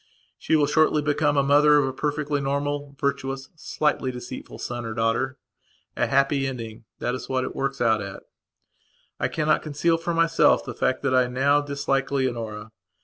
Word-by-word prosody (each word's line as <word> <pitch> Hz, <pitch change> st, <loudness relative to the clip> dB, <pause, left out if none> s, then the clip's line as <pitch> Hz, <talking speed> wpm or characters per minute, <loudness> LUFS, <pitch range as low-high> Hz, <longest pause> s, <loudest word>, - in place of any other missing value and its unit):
She -, -, +1 dB
will 150 Hz, -2 st, +4 dB
shortly 155 Hz, 0 st, +2 dB
become 145 Hz, 0 st, +1 dB
a 140 Hz, -, +4 dB
mother 145 Hz, +1 st, +5 dB
of 145 Hz, -, +3 dB
a 130 Hz, -, -3 dB
perfectly 145 Hz, +1 st, -1 dB
normal, 140 Hz, +1 st, -2 dB
virtuous 135 Hz, -1 st, -2 dB
slightly 150 Hz, -4 st, -1 dB
deceitful 125 Hz, 0 st, -8 dB
son 120 Hz, 0 st, -5 dB
or 110 Hz, 0 st, -5 dB
daughter. 115 Hz, +3 st, 0 dB, 0.6 s
A -, -, +1 dB
happy 140 Hz, 0 st, +2 dB
ending, 115 Hz, -4 st, -7 dB
that 120 Hz, -, -2 dB
is 130 Hz, -, -6 dB
what 130 Hz, -1 st, 0 dB
it -, -, -5 dB
works 135 Hz, 0 st, -2 dB
out 110 Hz, -3 st, +2 dB
at. 100 Hz, -1 st, -7 dB, 1.0 s
I -, -, +1 dB
cannot 155 Hz, 0 st, +1 dB
conceal 165 Hz, +2 st, 0 dB
from 170 Hz, 0 st, -2 dB
myself 165 Hz, 0 st, +3 dB
the 125 Hz, -, -5 dB
fact 130 Hz, +3 st, -1 dB
that 135 Hz, -2 st, +1 dB
I 130 Hz, -1 st, +4 dB
now 140 Hz, +4 st, +2 dB
dislike 140 Hz, -1 st, -1 dB
Leonora. 115 Hz, -5 st, -3 dB
135 Hz, 175 wpm, -24 LUFS, 125-145 Hz, 1.0 s, mother